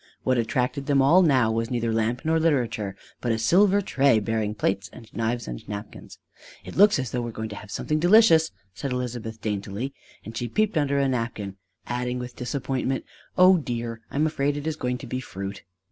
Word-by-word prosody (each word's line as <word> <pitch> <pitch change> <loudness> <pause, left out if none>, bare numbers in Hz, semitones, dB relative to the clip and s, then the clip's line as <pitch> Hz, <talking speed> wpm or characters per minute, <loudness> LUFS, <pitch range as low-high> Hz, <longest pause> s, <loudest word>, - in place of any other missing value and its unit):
What 130 -1 +2
attracted 125 +4 -1
them 140 -2 +3
all 150 +8 +6
now 130 -9 +4
was 115 0 -1
neither 115 -2 -1
lamp 115 +2 0
nor 160 +1 +3
literature, 120 -11 0 0.2
but 120 - -1
a 115 - +1
silver 195 - +4
tray 135 - +3
bearing 110 -1 -1
plates 95 -3 -1
and 115 -3 -12
knives 115 +1 -2
and - - -5
napkins. 105 0 -8 0.5
"It - - -8
looks 205 0 +6
as 130 -4 -3
though 125 - -1
we - - -3
were 120 - -4
going 110 0 -5
to 105 - -7
have 105 - -10
something 155 +9 -1
delicious," 175 -3 +6 0.2
said 135 +7 -4
Elizabeth 120 -3 -4
daintily; 105 +5 -3 0.3
and 110 - -8
she 120 +1 -2
peeped 215 - 0
under 140 -2 +1
a 140 -1 +2
napkin, 115 -6 -3 0.3
adding 125 0 -2
with 125 0 -6
disappointment: 130 +1 -2 0.3
"O 185 0 +7
dear! 115 -4 -4
I - - -11
am 150 +2 +3
afraid 145 -2 0
it 145 - -5
is 160 -1 -1
going 125 -4 -2
to - - -9
be 130 - -3
fruit!" 100 -4 -6
125 Hz, 205 wpm, -25 LUFS, 110-145 Hz, 0.5 s, O